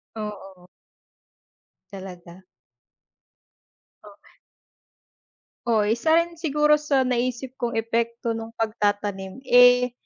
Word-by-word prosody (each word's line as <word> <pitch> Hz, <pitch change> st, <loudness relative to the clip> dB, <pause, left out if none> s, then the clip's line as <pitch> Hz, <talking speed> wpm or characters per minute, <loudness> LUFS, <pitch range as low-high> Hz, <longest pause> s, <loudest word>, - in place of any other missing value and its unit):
Oo. 195 Hz, -4 st, -8 dB, 1.3 s
Talaga. 185 Hz, -2 st, -11 dB, 1.6 s
Oh. 210 Hz, -, -13 dB, 1.6 s
Oo. 225 Hz, -3 st, +3 dB
Isa 235 Hz, +9 st, +2 dB
rin 335 Hz, 0 st, 0 dB
siguro 300 Hz, -1 st, +2 dB
sa 280 Hz, -3 st, +1 dB
naisip 250 Hz, +1 st, -2 dB
kong 235 Hz, -1 st, -2 dB
epekto 230 Hz, +1 st, -1 dB
no'ng 225 Hz, 0 st, -6 dB
pagtatanim, 205 Hz, -1 st, -2 dB
eh, 245 Hz, -1 st, +5 dB
230 Hz, 85 wpm, -24 LUFS, 205-255 Hz, 1.6 s, eh